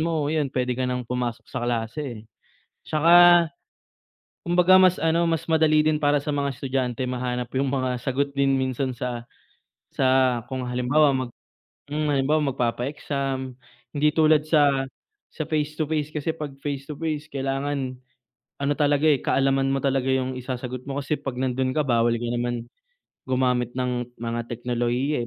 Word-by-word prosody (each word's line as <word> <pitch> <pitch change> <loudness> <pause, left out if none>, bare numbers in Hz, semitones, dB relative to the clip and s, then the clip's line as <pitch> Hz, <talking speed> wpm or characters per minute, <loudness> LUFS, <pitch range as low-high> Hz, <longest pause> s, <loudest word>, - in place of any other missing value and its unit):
mo 155 -2 0
'yun 150 -3 0
pwede 125 0 +1
ka 130 +1 -2
nang 125 -1 -2
pumasok 125 -1 -3
sa 125 - -6
klase, 115 0 -3 0.6
'tsaka 175 +2 +6 1.0
kumbaga 180 +2 +5
mas 185 -1 +4
ano, 165 +1 +2
mas 165 0 -1
madali 155 -1 +3
din 155 -1 +1
para 145 0 +3
sa 145 +1 -3
mga 140 -2 -2
estudyante 130 -2 -2
mahanap 125 -1 -2
yung 135 0 +1
mga 130 -2 -1
sagot 140 +1 -1
din 135 -1 +2
minsan 130 0 -1
sa 120 -1 -3 0.7
sa 135 - -1 0.4
kung 130 -1 -4
halimbawa 130 +5 +3
mag 125 -2 -4 0.6
hmm, 150 0 -1
halimbawa 140 0 +1
magpapa-exam 130 +2 -2 0.4
hindi 150 0 +1
tulad 155 -1 +4
sa 140 -4 +3 0.4
sa 155 - -5
face 155 -1 -2
to 155 - 0
face 150 -1 0
kasi 155 +1 -2
'pag 150 -4 -7
face 140 -2 -4
to 150 - -6
face 155 -1 -3
kailangan 135 -1 -3 0.6
ano 140 +1 +1
talaga, 145 +1 +2
eh, 145 -3 +4
kaalaman 135 0 +2
mo 135 - +1
talaga 135 -1 0
yung 130 0 0
isasagot 125 0 -5
mo 140 0 -3
kasi 145 +2 -1
'pag 135 -3 -5
nandun 130 0 0
ka 150 +2 +1
bawal 120 -1 +3
ka 120 0 -3
naman 120 -1 -2 0.6
gumamit 125 -2 0
ng 125 -1 -2
mga 115 0 -4
teknolohiya, 120 +4 -1
135 Hz, 155 wpm, -24 LUFS, 125-150 Hz, 1.0 s, tsaka